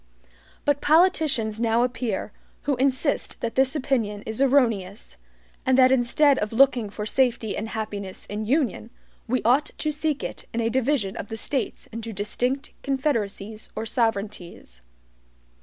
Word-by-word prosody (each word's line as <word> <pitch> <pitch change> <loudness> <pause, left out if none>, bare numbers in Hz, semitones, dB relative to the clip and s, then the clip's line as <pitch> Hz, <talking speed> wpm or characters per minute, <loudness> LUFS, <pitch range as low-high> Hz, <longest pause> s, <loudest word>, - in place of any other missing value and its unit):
But 290 -1 +2
politicians 305 - +3
now 230 0 +2
appear, 245 -5 -2 0.3
who 285 - +1
insist 270 +2 0
that 230 - -2
this 265 +3 +2
opinion 230 -8 -1
is 220 +3 -3
erroneous, 225 - +1 0.5
and 260 0 +3
that 260 -1 +6
instead 265 +3 +4
of 210 - -2
looking 245 -3 +4
for 210 +1 -5
safety 235 -2 +1
and 220 - -3
happiness 205 -4 -5
in 210 +1 -4
union, 245 - 0 0.4
we 250 +2 0
ought 260 +6 +3
to 305 - -1
seek 300 -1 -1
it - - -6
in - - 0
a 230 -1 +1
division 255 -5 0
of - - -5
the 225 - -6
States 265 +3 -3
into 225 0 -6
distinct 245 +7 -2
confederacies 220 -6 -2
or 220 - -3
sovereignties. 205 - -3
235 Hz, 145 wpm, -25 LUFS, 215-270 Hz, 0.5 s, that